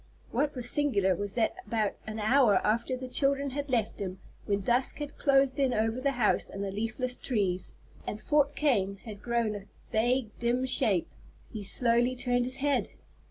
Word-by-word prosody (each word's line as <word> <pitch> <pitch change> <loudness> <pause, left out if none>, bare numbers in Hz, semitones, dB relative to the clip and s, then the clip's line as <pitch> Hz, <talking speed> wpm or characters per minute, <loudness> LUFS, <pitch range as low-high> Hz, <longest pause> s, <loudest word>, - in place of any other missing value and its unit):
What 285 +5 0
was 250 -1 -1
singular 245 -10 +2
was 205 +2 -4
that 235 +9 +1
about 220 -3 0
an 215 0 -5
hour 220 0 +4
after 235 +4 +1
the 255 0 -6
children 275 +1 +1
had 285 +1 -4
left 230 -4 0
him, 190 -2 -4 0.3
when 200 0 +1
dusk 245 +6 +1
had 295 -1 -6
closed 275 -1 +3
in 265 -3 +2
over 225 +3 0
the 275 +1 +1
house 240 -5 +2
and 195 - -5
the 195 - -3
leafless 225 +5 -2
trees, 195 -9 -2 0.3
and 210 - -4
"Fort 290 +2 +2
Kane" 200 -10 +1
had 210 -3 -8
grown 235 -2 0
a 205 -1 -7 0.3
vague 240 +1 +1
dim 240 +2 +1
shape, 205 -8 +2 0.5
he 215 -2 -5
slowly 240 +4 +2
turned 245 -1 +1
his 255 +1 -3
head! 285 +1 +1
240 Hz, 180 wpm, -29 LUFS, 210-265 Hz, 0.5 s, hour